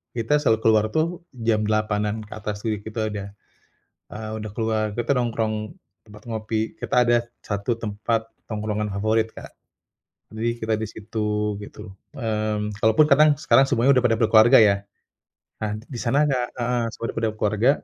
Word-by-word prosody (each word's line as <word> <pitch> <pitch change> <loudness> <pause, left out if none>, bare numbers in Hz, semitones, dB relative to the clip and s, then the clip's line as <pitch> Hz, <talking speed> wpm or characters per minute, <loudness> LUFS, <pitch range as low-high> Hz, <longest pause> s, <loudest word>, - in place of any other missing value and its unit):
kita 115 +4 0
selalu 115 -6 +3
keluar 110 -1 +5
tuh 170 +2 0 0.3
jam 110 -2 +3
20:00-an 105 0 0
ke - - -23
atas, 105 -1 -5
jadi 110 -2 0
kita 110 +1 -5
udah, 100 -1 -5 0.9
eee, 110 0 -6
udah 110 - -6
keluar, 110 -1 0
kita 120 +2 -2
nongkrong 115 -2 -1 0.5
tempat 105 -1 -15
ngopi. 110 0 -2 0.2
Kita - - -3
ada 120 - +4 0.3
1 105 +3 -2
tempat 110 +1 -2 0.2
tongkrongan 105 -1 -2
favorit, 110 +3 +1
Kak. - - -10 0.8
Jadi 110 +2 -1
kita 110 0 -1
di 110 - -3
situ, 105 -1 -2
gitu. 105 0 -10 0.2
Mmm, 110 -3 -2
kalaupun 110 +8 +5
kadang 155 +2 +7
sekarang 135 - +5
semuanya 130 0 +3
udah - - -3
pada 115 -1 +4
berkeluarga, 115 +3 +6
ya. 100 -2 +5 0.9
Nah, 105 -1 -2
di 120 +2 -9
sana, 140 +5 +2
Kak 125 -3 0
heeh, 120 0 0
semua - - -8
udah - - -14
pada 115 - +1
berkeluarga, 110 +4 +2
110 Hz, 160 wpm, -23 LUFS, 105-115 Hz, 0.9 s, kadang